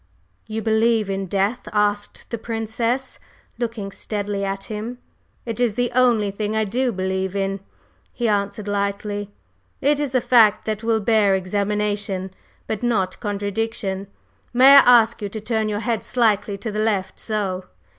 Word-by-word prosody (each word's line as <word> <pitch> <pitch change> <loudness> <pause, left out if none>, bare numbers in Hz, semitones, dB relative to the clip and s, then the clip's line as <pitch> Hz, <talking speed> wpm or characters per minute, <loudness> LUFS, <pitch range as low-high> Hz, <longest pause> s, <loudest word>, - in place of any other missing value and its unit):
"You 220 0 -4
believe 220 -2 +2
in 195 0 -2
Death?" 200 +6 -1
asked 205 -1 -1
the 235 - -3
Princess, 230 +3 -2 0.4
looking 225 -4 -3
steadily 205 -1 -3
at 195 0 -3
him. 220 +3 -5 0.5
"It 230 -1 -4
is 240 -4 +1
the 245 0 0
only 240 -5 +3
thing 210 +2 -3
I 220 - +2
do 245 +5 0
believe 190 -1 -2
in," 195 0 -1 0.5
he 240 -1 -2
answered 205 0 -1
lightly. 205 0 -2 0.5
"It 290 +1 +2
is 280 -3 -2
a - - +5
fact 220 -4 +4
that 215 -1 -2
will 225 -1 +1
bear 205 -2 +3
examination, 200 0 -1 0.3
but 220 - -3
not 205 -6 0
contradiction. 205 -1 -3 0.5
May 260 +3 +7
I 245 -4 +9
ask 225 +1 -5
you 205 - -3
to 220 - -6
turn 220 0 -1
your 205 0 -2
head 230 -2 -1
slightly 210 -4 +1
to 220 +2 -5
the 210 - -3
left 200 -4 -1
so! 195 -4 -2
210 Hz, 155 wpm, -22 LUFS, 200-230 Hz, 0.5 s, I